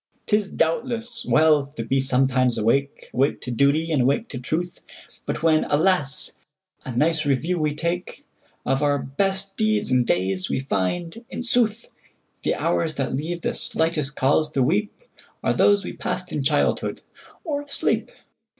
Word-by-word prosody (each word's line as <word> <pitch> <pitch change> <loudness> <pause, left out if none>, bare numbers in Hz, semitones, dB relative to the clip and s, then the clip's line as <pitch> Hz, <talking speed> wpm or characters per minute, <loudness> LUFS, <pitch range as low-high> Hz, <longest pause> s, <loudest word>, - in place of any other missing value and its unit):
'T 210 - +2
is, 210 -2 0
doubtless, 230 +7 0
well 155 -2 +5
to 135 -4 -7
be 135 +4 +1
sometimes 130 -2 +2
awake,—Awake 135 +3 0
to 125 - -6
duty, 140 +7 +2
and 145 -4 +2
awake 140 - +1
to 125 - -5
truth,—But 160 +3 -6
when, 160 -1 +4
alas! 150 -2 +1 0.5
a 130 - -6
nice 160 +2 +2
review 155 +5 0
we 150 -1 0
takeOf 170 +3 -3 0.6
our 145 -1 +2
best 195 +8 -1
deeds 215 -8 +1
and 125 -1 +4
days, 95 -2 0
we - - -1
find, 165 - -2
in - - -5
sooth, 235 -2 0 0.5
The - - 0
hours 160 -2 0
that 135 -1 -2
leave 170 +5 -3
the - - -1
slightest 155 -3 -1
cause 150 +3 +2
to 135 - +2
weepAre 205 - -3
those 205 0 +4
we - - -5
passed 185 0 -4
in 150 - -2
childhood 145 +1 0 0.4
or 295 -6 -2
asleep! 290 -1 0
155 Hz, 150 wpm, -23 LUFS, 135-190 Hz, 0.6 s, well